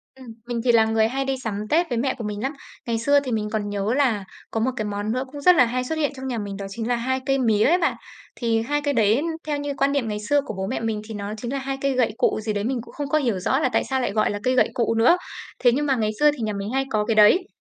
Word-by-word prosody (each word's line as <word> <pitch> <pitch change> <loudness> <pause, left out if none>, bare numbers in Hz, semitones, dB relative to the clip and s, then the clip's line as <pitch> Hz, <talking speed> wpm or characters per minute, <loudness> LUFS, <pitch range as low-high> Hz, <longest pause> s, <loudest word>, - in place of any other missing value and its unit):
Ừm. 260 -2 -13 0.2
Mình 240 -1 -2
thì 240 - +5
là 225 -1 +5
người 220 0 +2
hay 270 +3 -2
đi 270 0 0
sắm 210 -1 -3
Tết 335 +1 +2
với 240 - -1
mẹ 260 +3 0
của 230 - -6
mình 210 -1 -4
lắm. 270 +3 -1 0.3
Ngày 230 -1 0
xưa 285 +4 +4
thì 265 -3 -5
mình 210 -1 -1
còn 210 -1 -2
nhớ 205 +2 -1
là 250 -7 +1 0.3
có 225 - -1
một 255 +4 +1
cái 215 -4 -2
món 205 +1 -3
nữa 255 +2 -1
cũng 290 - -8
rất 360 +5 +6
là 250 - +6
hay 250 +2 -2
xuất 320 +6 -3
hiện 290 -3 0
trong 265 0 -6
nhà 245 - -2
mình 200 -2 -5
đó 200 - -5
chính 225 +3 -5
là 245 - +1
2 260 +2 -1
cây 270 0 +1
mía 220 -4 +3
ấy 350 +4 +4
bạn. 340 - +1 0.4
Thì 230 -2 0
2 290 +5 -1
cây 285 0 0
đấy 225 +1 +3 0.3
theo 295 -1 0
như 285 0 -3
quan 275 +1 +2
niệm 280 -5 0
ngày 210 -1 -3
xưa 285 +8 +1
của - - -5
bố 190 0 -2
mẹ 255 - -2
mình 225 -2 -2
thì 225 - -7
nó 205 0 -5
chính 240 +3 -5
là 275 - -1
2 270 0 -4
cây 275 -1 +1
gậy 245 -4 +1
cụ - - +1
gì 215 0 -1
đấy, 205 0 -2
mình 245 0 -1
cũng - - -14
không 290 -1 -4
có 310 - +3
hiểu 235 -10 0
rõ 260 +9 +1
là 305 - +1
tại - - +2
sao 265 -1 -1
lại 245 - -1
gọi 215 0 +1
là 205 - -4
cây 255 0 +2
gậy - - +4
cụ 230 -1 +1
nữa, 250 +11 +5 0.4
thế 245 - +5
nhưng 290 +5 0
mà 270 -2 +2
ngày 215 -2 0
xưa 295 0 +6
thì 295 - -9
nhà 215 -1 -1
mình 200 +1 -4
hay 270 0 +1
có 210 -3 0
cái 225 - 0
đấy. 215 - +5
240 Hz, 325 wpm, -23 LUFS, 215-270 Hz, 0.4 s, rất